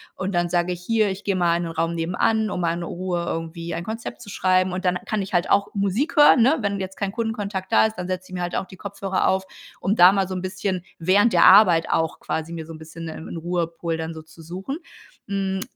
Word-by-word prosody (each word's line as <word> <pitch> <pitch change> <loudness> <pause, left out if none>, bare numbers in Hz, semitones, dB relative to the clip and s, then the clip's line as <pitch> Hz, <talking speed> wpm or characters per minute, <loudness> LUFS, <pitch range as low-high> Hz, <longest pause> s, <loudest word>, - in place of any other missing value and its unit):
und 190 +1 -3
dann 175 0 +1
sage 175 +1 +1
ich: 175 - -9
„Hier, 220 +2 +2
ich 190 +1 -7
gehe 195 -2 0
mal 170 -1 +2
den 170 - -3
Raum 165 +1 -1
nebenan, 200 +6 +1
um 190 - -3
mal 170 -2 +1
in 170 0 -4
Ruhe 175 0 -3
irgendwie 165 0 -4
ein 170 +1 -4
Konzept 225 +1 -6
zu - - -10
schreiben,“ 185 -2 +2
und 185 +1 -4
dann 180 -1 +2
kann 215 -2 -1
ich 195 0 -7
halt 175 -1 +1
auch 200 - +3
Musik 205 - -1
hören, 295 -4 +7
ne, 270 +7 +4
wenn 200 -3 -1
jetzt 190 0 -6
kein 195 -1 -2
Kundenkontakt 210 -4 -3
da 225 - +5
ist. 220 0 -3
Dann 180 -1 -4
setze 185 0 -4
ich - - -9
mir 180 - -3
halt 175 0 -2
auch - - -2
die 190 - -13
Kopfhörer 195 0 -1
auf, 190 0 0 0.3
um 200 - 0
da 180 -2 +8
mal 195 -1 +1
so 185 - -4
'n 185 - -3
bisschen 185 -1 -3 0.2
während 195 +7 +4
der 175 - +5
Arbeit 185 -5 +7
auch 160 -1 0
quasi 160 +1 -4
mir 165 -1 -6
so 165 - -9
'n - - -9
bisschen 165 +1 -9
'n 160 +1 -7
Ruhepol 170 0 -2
dann 160 0 -4
so 160 -1 -9
zu 160 +1 -16
suchen. 185 - -6 0.5
Hm. 195 -1 -1
185 Hz, 250 wpm, -23 LUFS, 170-200 Hz, 0.5 s, da